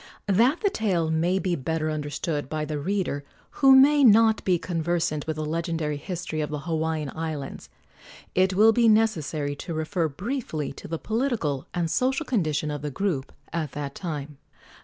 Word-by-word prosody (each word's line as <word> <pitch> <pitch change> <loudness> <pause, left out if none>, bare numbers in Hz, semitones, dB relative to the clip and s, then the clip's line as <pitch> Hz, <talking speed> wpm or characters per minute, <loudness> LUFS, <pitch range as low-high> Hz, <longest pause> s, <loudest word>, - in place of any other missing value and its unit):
That 235 - +3
the 405 -3 +2
tale 180 - 0
may 170 +4 +1
be 185 -2 0
better 155 +2 -2
understood 145 -1 -3
by 155 -1 -2
the 150 -1 -3
reader 175 -3 -1 0.4
who 270 -1 +8
may 285 +2 +6
not 225 -2 +6
be 180 -2 +3
conversant 165 -3 -1
with 160 - -1
the 155 0 -3
legendary 160 -1 -2
history 165 -1 -4
of 150 - -2
the 150 -1 -4
Hawaiian 160 -2 -2
Islands, 155 -4 -5 0.6
it 185 0 +2
will 220 +3 +6
be 235 +1 +4
necessary 160 -10 +1
to 165 +3 -5
refer 160 +2 0
briefly 170 - -4
to - - -10
the 165 - -3
political 220 - -1
and 175 -2 0
social 265 - 0
condition 155 - 0
of 145 -2 -4
the 150 - -3
group 155 -4 -2 0.2
at 155 -5 -2
that 145 -1 -4
time. 150 -5 -6
165 Hz, 170 wpm, -25 LUFS, 150-200 Hz, 0.6 s, who